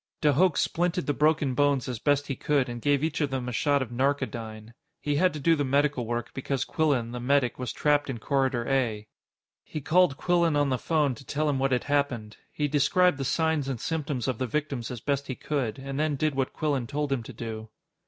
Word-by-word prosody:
De 150 -2 +3
Hooch 180 +4 +4
splinted 175 +1 0
the 145 - 0
broken 150 -2 +2
bones 140 -1 +2
as 125 -3 -4
best 145 +1 +2
he 135 - -3
could 140 -2 +1
and 120 -1 -6
gave 145 +1 +2
each 160 0 -1
of 145 - +1
them 130 -2 -3
a - - -2
shot 140 +3 +2
of 120 - -10
narcodyne. 115 -4 -2 0.3
He 145 -1 -1
had 180 +3 +4
to 150 - -5
do 165 +4 +3
the 145 - 0
medical 140 -2 +1
work 120 0 -3
because 135 0 -2
Quillan, 140 -8 0
the 125 - -5
medic, 125 0 +1
was 125 - -3
trapped 145 -1 +1
in 130 - -3
Corridor 130 0 0
A. 120 -6 0 0.6
He 155 - -6
called 155 0 +3
Quillan 170 -3 +2
on 145 -1 +2
the 130 -2 0
phone 150 -5 +1
to 125 - -12
tell 150 +4 -1
him 140 -2 +1
what 135 0 +1
had 125 - +1
happened. 140 -7 -1
He 150 - -1
described 150 +3 +3
the - - -1
signs 160 -1 +1
and 130 -4 -3
symptoms 145 -4 -2
of 130 -4 -1
the 130 - -1
victims 140 -2 -2
as 120 -3 -6
best 140 +1 -1
he 130 - -3
could, 135 -6 -2
and 135 +1 -5
then 155 -1 +1
did 155 +2 0
what 135 -1 -1
Quillan 140 -6 -1
told 145 +1 -2
him 135 -3 0
to 115 - -10
do. 110 -1 -6
140 Hz, 230 wpm, -27 LUFS, 125-150 Hz, 0.6 s, Hooch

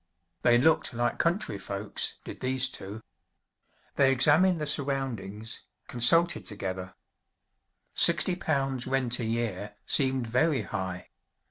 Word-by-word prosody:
They 120 -1 +4
looked 155 -2 +2
like 120 0 -1
country 170 - -1
folks, 100 +1 -4
did - - -9
these 130 0 +1
two. 105 -3 -7 1.0
They 135 -1 +4
examined 160 +7 +3
the 150 - -3
surroundings, 130 -8 -4 0.3
consulted 165 +9 +3
together 95 -3 -6 1.0
sixty 175 +1 +6
pounds 135 -8 -2
rent 130 -2 +1
a 120 - -3
year 105 -3 -3
seemed 130 -3 +2
very 130 +2 0
high! 95 -4 -6
125 Hz, 115 wpm, -27 LUFS, 105-140 Hz, 1.0 s, sixty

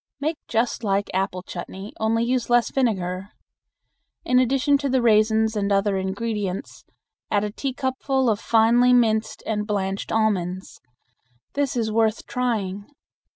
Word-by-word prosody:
Make 310 +2 -1
just 230 +1 -1
like 200 -1 0
apple 185 -1 -1
chutney, 190 +3 -8
only 225 +1 +1
use 245 0 -1
less 240 -1 +3
vinegar. 195 -7 -1 1.0
In 250 0 +4
addition 275 +3 +2
to 280 -1 -1
the 260 0 +2
raisins 220 -1 +3
and 205 -1 -1
other 200 0 +2
ingredients, 200 0 -4 0.5
add 205 0 +1
a 210 - -2
teacupful 265 +1 -1
of 215 -3 +2
finely 235 +3 +4
minced 220 -3 +2
and 210 -1 -2
blanched 195 -2 -2
almonds. 190 -4 -1 0.7
This 280 -3 -1
is 220 -2 0
worth 220 0 +1
trying. 205 -6 -2
220 Hz, 135 wpm, -23 LUFS, 200-245 Hz, 1.0 s, In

